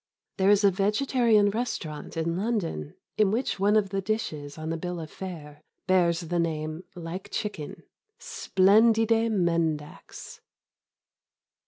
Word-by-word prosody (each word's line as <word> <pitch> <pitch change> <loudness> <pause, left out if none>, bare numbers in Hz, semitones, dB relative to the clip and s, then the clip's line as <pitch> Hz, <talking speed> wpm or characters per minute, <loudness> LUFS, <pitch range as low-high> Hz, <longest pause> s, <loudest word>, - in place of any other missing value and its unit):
There 190 0 +3
is 205 0 +5
a 200 - +6
vegetarian 210 +1 +2
restaurant 175 -10 -4
in 165 +1 -1
London 175 - -2 0.2
in 210 -2 +5
which 225 -1 -1
one 205 +2 +3
of 210 -2 +2
the 195 -1 -1
dishes 155 -9 -3
on 160 +1 -4
the 165 - -2
bill 175 +1 -4
of 160 -1 -8
fare 150 -6 -8 0.2
bears 175 -3 +2
the 175 +1 -2
name 155 0 -2
"Like 175 +2 -7
chicken." 205 -9 -5 0.4
_Splendide 225 - +3
mendax! 165 -6 -2
185 Hz, 130 wpm, -27 LUFS, 165-215 Hz, 0.4 s, a